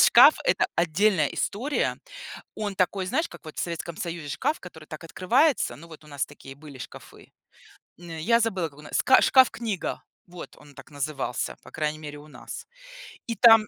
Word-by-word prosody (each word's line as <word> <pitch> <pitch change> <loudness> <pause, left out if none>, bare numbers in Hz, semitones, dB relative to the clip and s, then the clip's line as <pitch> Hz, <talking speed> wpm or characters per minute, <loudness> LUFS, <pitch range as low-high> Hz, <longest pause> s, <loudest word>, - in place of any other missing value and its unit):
шкаф— - - +8
это - - +3
отдельная 170 0 +3
история. 255 - -1 0.6
Он 205 -2 -3
такой, 185 +1 0
знаешь, 315 - 0
как - - -13
вот 155 - -10
в - - -2
Советском 170 -1 -4
Союзе 170 -3 -5
шкаф, 300 - -1
который 160 -4 -11
так 155 +2 -9
открывается, 190 - +2
ну, 165 +6 -12
вот 160 -1 -13
у - - -16
нас 140 -1 -2
такие 135 -2 -12
были 145 -2 -12
шкафы. 125 - -11 0.7
М, 175 -1 -11
я 230 +9 +3
забыла, 190 -7 0
как 145 -1 -20
у - - -12
нас 150 - -3
ска 260 - +6
шкаф-книга. 235 -6 +2 0.2
Вот, 180 -1 -10
он 145 -1 -17
так - - -13
назывался, 140 -3 -3
по - - -14
крайней 155 -1 -2
мере, 150 -1 -8
у 150 +1 -14
нас. - - -9 0.6
И 230 - -2
там 225 -1 +7
170 Hz, 185 wpm, -26 LUFS, 150-210 Hz, 0.7 s, шкаф